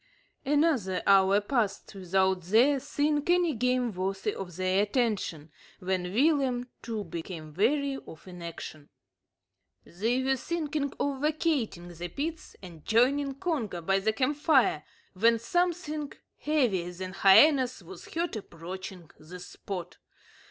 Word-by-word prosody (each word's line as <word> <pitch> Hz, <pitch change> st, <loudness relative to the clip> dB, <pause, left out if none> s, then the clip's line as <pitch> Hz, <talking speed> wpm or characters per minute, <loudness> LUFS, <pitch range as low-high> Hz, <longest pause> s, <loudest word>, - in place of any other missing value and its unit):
Another 275 Hz, -, +1 dB
hour 195 Hz, 0 st, +5 dB
passed 210 Hz, -3 st, -1 dB
without 190 Hz, 0 st, +1 dB
their 235 Hz, -, +3 dB
seeing 295 Hz, +2 st, 0 dB
any 350 Hz, -2 st, +3 dB
game 250 Hz, -1 st, 0 dB
worthy 195 Hz, +2 st, -2 dB
of 180 Hz, -3 st, -7 dB
their 185 Hz, +2 st, +1 dB
attention, 205 Hz, -, -1 dB, 0.3 s
when 180 Hz, -1 st, -2 dB
Willem, 260 Hz, 0 st, +2 dB
too, 225 Hz, -3 st, -4 dB
became 165 Hz, -3 st, -7 dB
weary 270 Hz, -, +1 dB
of 160 Hz, -, -12 dB
inaction. 170 Hz, -4 st, -8 dB, 1.0 s
They 230 Hz, +8 st, -1 dB
were 265 Hz, 0 st, +1 dB
thinking 300 Hz, -2 st, -2 dB
of 275 Hz, -2 st, -1 dB
vacating 295 Hz, -, -1 dB
the 175 Hz, 0 st, -6 dB
pits 315 Hz, -, -5 dB
and 170 Hz, -4 st, -11 dB
joining 270 Hz, +5 st, +2 dB
Congo 270 Hz, -, -2 dB
by 195 Hz, +3 st, +1 dB
the 215 Hz, +3 st, +1 dB
camp 265 Hz, +5 st, 0 dB
fire, 270 Hz, -, +3 dB, 0.3 s
when 230 Hz, +4 st, +3 dB
something 310 Hz, +2 st, -1 dB, 0.3 s
heavier 235 Hz, -, 0 dB
than 185 Hz, +1 st, -6 dB
hyenas 255 Hz, +7 st, +5 dB
was 385 Hz, -, -12 dB
heard 335 Hz, -4 st, -2 dB
approaching 185 Hz, -2 st, -8 dB
the 175 Hz, +4 st, -11 dB
spot. 180 Hz, 0 st, -7 dB
220 Hz, 125 wpm, -28 LUFS, 185-285 Hz, 1.0 s, hour